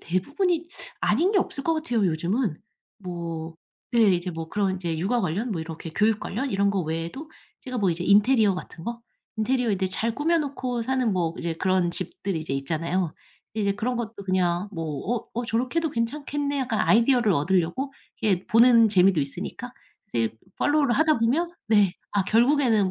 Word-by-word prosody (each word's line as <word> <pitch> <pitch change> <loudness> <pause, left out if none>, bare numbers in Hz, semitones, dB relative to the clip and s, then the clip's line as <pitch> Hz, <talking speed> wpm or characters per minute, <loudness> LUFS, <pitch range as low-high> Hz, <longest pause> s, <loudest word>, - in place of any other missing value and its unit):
대부분이 325 - -1 0.3
아닌 330 - +2
게 390 - +4
없을 275 - -2
것 330 - +2
같아요 240 - 0
요즘은. 175 - -1 0.4
뭐 170 -4 -6 0.4
네. 235 - +3
이제 175 +1 -2
뭐 165 -1 -6
그런 195 0 0
이제 170 -3 -3
육아 220 +8 +1
관련 195 +7 -2
뭐 165 - -3
이렇게 160 0 -7
교육 215 +2 +3
관련 260 +7 -3
이런 200 0 +2
거 195 - 0
외에도 165 - -4 0.3
제가 255 -1 -6
뭐 195 -3 +2
이제 170 +1 -2
인테리어 210 +1 +4
같은 180 -2 -8
거 235 0 -5 0.3
인테리어 245 +1 +1
이제 190 -1 0
잘 225 +4 -1
꾸며 325 +5 +2
놓고 260 -5 -3
사는 255 -2 0
뭐 170 -3 0
이제 170 -1 -2
그런 185 0 +1
집들이 185 0 -3
이제 155 -3 -4
있잖아요. 165 +5 -1 0.4
이제 200 -2 0
그런 245 +4 -2
것도 220 -4 -5
그냥 185 0 0
뭐 165 -4 -4 0.3
'어 - - -16
어 240 +1 -2
저렇게 245 +6 -1
해도 325 -2 0
괜찮겠네.' 285 +4 -2
약간 240 -5 -1
아이디어를 235 0 +4
얻으려고 180 - 0 0.3
이게 195 -5 +1
보는 230 -1 +6
재미도 185 -4 +4
있으니까 140 0 -5 0.4
이제 115 -1 -1 0.2
팔로우를 290 -4 +2
하다 310 0 +3
보면 275 +10 +1 0.2
네. 205 -4 +4 0.2
아 205 - +2
결국에는 230 -3 +3
210 Hz, 365 characters per minute, -25 LUFS, 175-250 Hz, 0.4 s, 보는